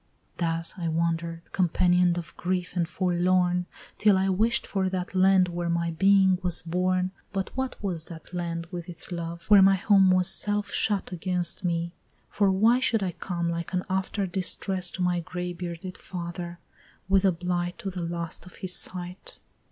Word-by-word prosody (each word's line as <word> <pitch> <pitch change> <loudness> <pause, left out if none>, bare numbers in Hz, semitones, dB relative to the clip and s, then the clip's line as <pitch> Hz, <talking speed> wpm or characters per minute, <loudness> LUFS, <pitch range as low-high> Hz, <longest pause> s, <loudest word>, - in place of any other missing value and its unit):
Thus 165 -1 -1
I 170 - -2
wander'd, 165 +1 -2
companion'd 180 0 +3
of 170 -2 -6
grief 180 0 -2
and 170 -2 0
forlorn 180 0 +1 0.3
Till 210 -2 +5
I 190 +1 +1
wish'd 220 +5 +1
for 190 -2 -1
that 185 0 -4
land 190 0 +5
where 175 0 -3
my 170 0 0
being 190 +2 +4
was 180 -2 0
born 180 +2 0 0.2
But 195 -2 -3
what 260 -1 -2
was 170 -5 -2
that 165 +1 -11
land 170 -1 -3
with 175 -1 -6
its 170 +1 -5
love, 170 0 -5
where 205 -2 +9
my 195 0 +6
home 195 0 +4
Was 185 -1 +4
self 205 +2 0
shut 205 -3 0
against 180 0 -1
me; 170 -1 -1 0.4
for 200 -2 +2
why 220 +6 +4
should 225 -5 +1
I 185 - -1
come 170 0 -3
Like 170 +2 -4
an 180 0 0
after 190 +1 -1
distress 185 0 -1
to 185 - -2
my 180 -1 +1
gray 180 +1 -5
bearded 175 +1 -6
father, 175 -1 -6 0.5
With 195 0 +3
a 190 - +5
blight 175 0 -2
to 195 - -5
the 180 -1 -5
last 170 +1 -4
of 180 - -14
his 185 -1 -1
sight? 180 0 -2
180 Hz, 175 wpm, -27 LUFS, 170-190 Hz, 0.5 s, where